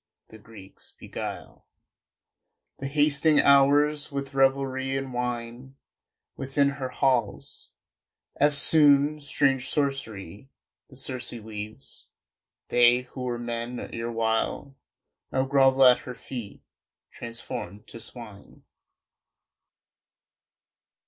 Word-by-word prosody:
The 110 - -14
Greeks 105 -3 -13
beguile - - -8 1.1
The 135 - -4
hasting 150 +1 +4
hours 145 +2 +4
with 140 0 -5
revelry 135 0 +1
and 135 -1 -5
wine 125 +1 -5 0.6
Within 140 +1 0
her 140 -2 -5
halls.... 125 -6 -2 0.7
Eftsoon 145 0 +5
strange 140 -3 0
sorcery 130 - -3 0.4
The 135 - -16
Circe 130 -2 -2
weaves. 110 +2 -8 0.6
They 120 0 +5
who 130 - -8
were 125 -1 -3
men 120 +1 -4
erewhile 115 +3 -2 0.6
Now 130 0 0
grovel 135 -1 +4
at 125 -1 +6
her 125 - -9
feet, 120 -6 -8 0.5
transformed 115 -3 -6
to 115 - -10
swine. 115 -4 -9
130 Hz, 90 wpm, -26 LUFS, 115-140 Hz, 1.1 s, at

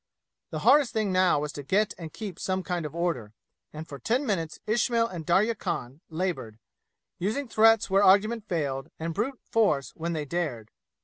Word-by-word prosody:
The - - -4
hardest 290 -5 +5
thing 215 -3 0
now 185 -4 +3
was 150 0 -3
to 145 - -7
get 200 +9 +1
and 165 -3 -8
keep 200 -5 -7
some 185 0 -1
kind 175 -4 -2
of 150 - -12
order, 150 -12 -2 0.4
and 155 +1 -8
for 140 -2 -8
ten 245 - 0
minutes 165 -9 -2
Ismail 230 +1 +2
and 170 -7 -7
Darya 200 +7 +3
Khan 140 - -4
labored, 160 - -3 0.6
using 225 +10 -1
threats 225 0 +4
where 195 +1 +3
argument 210 +3 +4
failed, 140 -6 -2
and 165 +1 -3
brute 240 +9 -2
force 200 -12 +1
when 170 +1 -4
they 155 -2 -3
dared. 140 -9 -3
180 Hz, 180 wpm, -27 LUFS, 155-215 Hz, 0.6 s, hardest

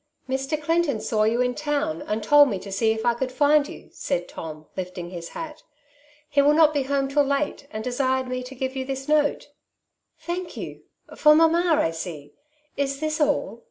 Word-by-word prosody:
^' - - -1
Mr. 270 +3 -1
Clinton 325 -5 +1
saw 215 0 +1
you 230 +3 +2
in 250 0 +1
town, 290 - -2
and 215 +1 -2
tiold 290 +4 +6
me 200 - -2
to 195 +1 -9
see 220 +3 +2
if 220 0 -3
I 240 - +4
could 255 +2 -3
find 290 +2 +3
you/' - - -12
said - - -2
Tom, 155 -1 -8
lifting 180 -1 -5
his 170 -2 -7
hat. 310 -2 -7 0.3
" 295 +1 -31
He 285 -1 +3
will 290 +1 +4
not 310 -1 +5
be 290 - +1
home 275 0 0
till 285 +2 +2
late, 280 0 -1
and 215 0 -5
desired 260 +1 0
me 255 0 -3
to 255 +2 -9
giye 260 +1 -3
you 265 -1 -3
this 270 +1 -5
note.'' 300 -1 +1 0.4
" - - -50
Thank 350 0 -4
you! - - -7 0.3
For 300 0 +6
mamma, 330 +1 +4
I 165 - +2
see. 160 -4 -7 0.4
Is 275 0 -1
this 310 +1 -2
all 290 -5 0
270 Hz, 210 wpm, -24 LUFS, 225-295 Hz, 0.4 s, tiold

